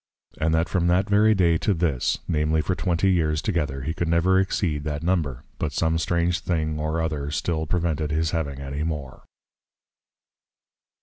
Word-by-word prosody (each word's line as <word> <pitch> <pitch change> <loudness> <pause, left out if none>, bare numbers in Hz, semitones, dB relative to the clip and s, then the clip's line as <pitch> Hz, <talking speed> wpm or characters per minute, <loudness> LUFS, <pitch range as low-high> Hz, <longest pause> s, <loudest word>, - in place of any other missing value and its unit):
_ - - -29
And 80 - +2
that 80 +1 +1
from 85 -2 0
that 90 +3 +2
very 105 +1 +4
day 85 -4 +3
to 105 - +1
this, 80 -7 0
namely 80 0 +1
for 95 - -1
twenty 90 +1 +1
years 80 -4 +1
together, 75 -8 -1
he 80 - -2
could 85 - -2
never 85 +3 +3
exceed 90 -6 0
that 75 0 -3
number; 80 -8 -1 0.2
but 75 -2 -2
some 80 +3 +1
strange 85 +2 +1
thing 80 -3 -1
or 80 +2 -1
other 75 -3 -2
still 80 +1 -2
prevented 80 -2 -1
his 80 +1 0
having 70 -5 -2
any 70 +1 -5
more. 75 -5 -4
80 Hz, 175 wpm, -24 LUFS, 75-85 Hz, 0.2 s, very